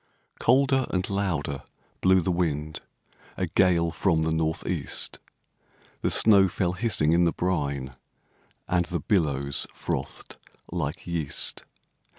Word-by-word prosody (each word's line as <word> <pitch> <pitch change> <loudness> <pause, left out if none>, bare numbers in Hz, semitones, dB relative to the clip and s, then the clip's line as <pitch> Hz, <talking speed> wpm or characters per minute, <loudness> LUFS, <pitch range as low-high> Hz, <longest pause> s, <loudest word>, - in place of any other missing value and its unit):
Colder 135 +1 +3
and 90 0 -1
louder 80 -9 -1 0.4
blew 95 0 +5
the 90 - 0
wind, 80 -3 -1 0.6
A 95 - 0
gale 85 -1 +2
from 80 -1 +1
the 80 - 0
North 80 0 -1
east; - - -3 0.8
The - - +1
snow 100 -3 +6
fell 90 -1 -1
hissing 90 -7 +1
in 85 +1 +4
the 85 - +3
brine, 70 -8 -2 0.7
And 90 -1 +1
the 85 - -2
billows 70 -7 0
frothed - - -5 0.3
like 80 -4 -3
yeast. 85 -5 -1
85 Hz, 125 wpm, -26 LUFS, 75-95 Hz, 0.8 s, snow